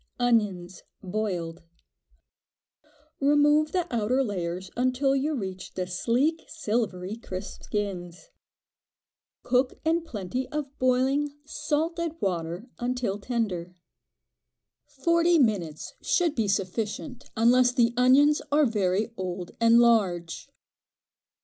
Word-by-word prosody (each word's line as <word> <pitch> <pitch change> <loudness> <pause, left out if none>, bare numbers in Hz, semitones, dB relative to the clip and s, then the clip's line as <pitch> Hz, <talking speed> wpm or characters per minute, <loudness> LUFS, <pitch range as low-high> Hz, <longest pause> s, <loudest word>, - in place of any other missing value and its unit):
Onions 205 -7 0 0.2
(boiled). 180 -4 -3 1.6
Remove 295 +2 +4
the 360 -2 0
outer 240 +5 +1
layers 180 -4 -4
until 255 +2 +1
you 295 +3 0
reach 190 -6 -6
the 185 - -2
sleek, 245 - 0
silvery, 215 - -2
crisp 190 -4 -7
skins. 185 - -4 1.1
Cook 255 +1 +1
in 330 +1 +2
plenty 250 - -4
of 295 -2 -5
boiling, 265 +3 +1
salted 330 +2 -2
water, 175 +3 -3
until 245 -5 -2
tender. 200 -7 -3 1.1
Forty 335 0 +2
minutes 195 - 0
should 355 -11 +1
be 225 -6 0
sufficient, 210 - -3
unless 245 +2 +5
the 240 -1 +2
onions 270 +5 +5
are 295 +1 +4
very 210 -1 0
old 180 -1 -4
and 230 0 +6
large. 200 -5 +2
235 Hz, 100 wpm, -27 LUFS, 190-275 Hz, 1.6 s, and